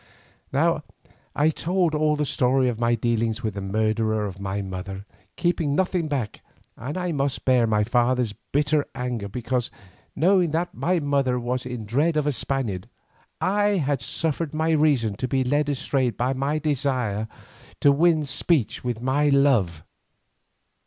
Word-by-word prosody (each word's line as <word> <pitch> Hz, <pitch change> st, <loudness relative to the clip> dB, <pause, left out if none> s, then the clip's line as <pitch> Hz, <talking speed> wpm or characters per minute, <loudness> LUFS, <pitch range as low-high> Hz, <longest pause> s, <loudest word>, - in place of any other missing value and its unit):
Now -, -, +2 dB, 0.5 s
I 150 Hz, +2 st, +3 dB
told 175 Hz, +1 st, 0 dB
all 150 Hz, 0 st, +2 dB
the 150 Hz, 0 st, -1 dB
story 130 Hz, -1 st, +2 dB
of 115 Hz, -2 st, -4 dB
my 120 Hz, 0 st, +2 dB
dealings 115 Hz, 0 st, -1 dB
with 110 Hz, -2 st, -1 dB
the 100 Hz, -, -5 dB
murderer 110 Hz, +2 st, 0 dB
of 95 Hz, -1 st, -6 dB
my 100 Hz, +1 st, -3 dB
mother, 95 Hz, +1 st, -6 dB, 0.3 s
keeping 170 Hz, -4 st, 0 dB
nothing 180 Hz, -2 st, 0 dB
back, 130 Hz, -8 st, -3 dB, 0.3 s
and 140 Hz, +8 st, -5 dB
I 180 Hz, -1 st, -1 dB
must 140 Hz, -3 st, -2 dB
bear 125 Hz, -3 st, +4 dB
my 105 Hz, -1 st, +2 dB
father's 120 Hz, 0 st, +1 dB, 0.2 s
bitter 150 Hz, +1 st, +2 dB
anger 125 Hz, -5 st, -3 dB
because 120 Hz, +3 st, -2 dB, 0.5 s
knowing 180 Hz, +2 st, +3 dB
that 170 Hz, +2 st, -1 dB
my 180 Hz, +1 st, 0 dB
mother 140 Hz, -4 st, +1 dB
was 125 Hz, +1 st, -3 dB
in 125 Hz, -3 st, -5 dB
dread 150 Hz, +9 st, +1 dB
of 150 Hz, -, +1 dB
a 145 Hz, -, +2 dB
Spaniard, 125 Hz, -9 st, -2 dB, 0.5 s
I 205 Hz, +1 st, +2 dB
had 145 Hz, -5 st, 0 dB
suffered 155 Hz, +4 st, -2 dB
my 160 Hz, +1 st, +1 dB
reason 145 Hz, -9 st, +2 dB
to 130 Hz, -, -2 dB
be 130 Hz, +1 st, +1 dB
led 145 Hz, +3 st, +1 dB
astray 135 Hz, -2 st, 0 dB
by 125 Hz, +3 st, -1 dB
my 140 Hz, +3 st, -1 dB
desire 130 Hz, -8 st, -1 dB, 0.5 s
to 145 Hz, -, +6 dB
win 160 Hz, +1 st, +3 dB
speech 145 Hz, -, 0 dB
with 120 Hz, -2 st, -3 dB
my 145 Hz, +3 st, +2 dB
love. 120 Hz, -, +3 dB
130 Hz, 160 wpm, -24 LUFS, 115-150 Hz, 0.5 s, to